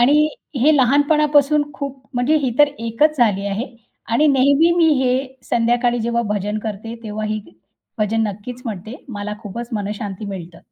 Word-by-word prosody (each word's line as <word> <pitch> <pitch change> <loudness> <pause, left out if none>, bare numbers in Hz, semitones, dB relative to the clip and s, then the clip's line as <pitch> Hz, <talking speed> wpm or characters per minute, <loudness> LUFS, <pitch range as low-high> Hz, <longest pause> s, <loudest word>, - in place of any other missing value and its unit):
आणि 295 +5 +5 0.3
हे 310 +2 +6
लहानपणापासून 290 +2 +4
खूप 280 -1 -5 0.2
म्हणजे 245 +6 +2
ही 255 - +1
तर 295 0 +7
एकच 230 +7 +1
झाली 200 -4 +2
आहे 200 +5 -2 0.5
आणि 300 +6 +4
नेहमी 280 +5 +4
मी 330 -2 +5
हे 250 -1 +2 0.4
संध्याकाळी 240 +1 +2
जेव्हा 235 +1 0
भजन 205 +2 -2
करते 220 +1 -5
तेव्हा 215 0 -4
ही 215 0 -2 0.6
भजन 215 +2 +1
नक्कीच 240 +5 -8
म्हणते. 215 +2 -6
मला 210 -2 -5
खूपच 230 +3 -6
मनःशांती 205 -1 -4
मिळतं. 175 -4 -7
235 Hz, 150 wpm, -20 LUFS, 210-280 Hz, 0.6 s, तर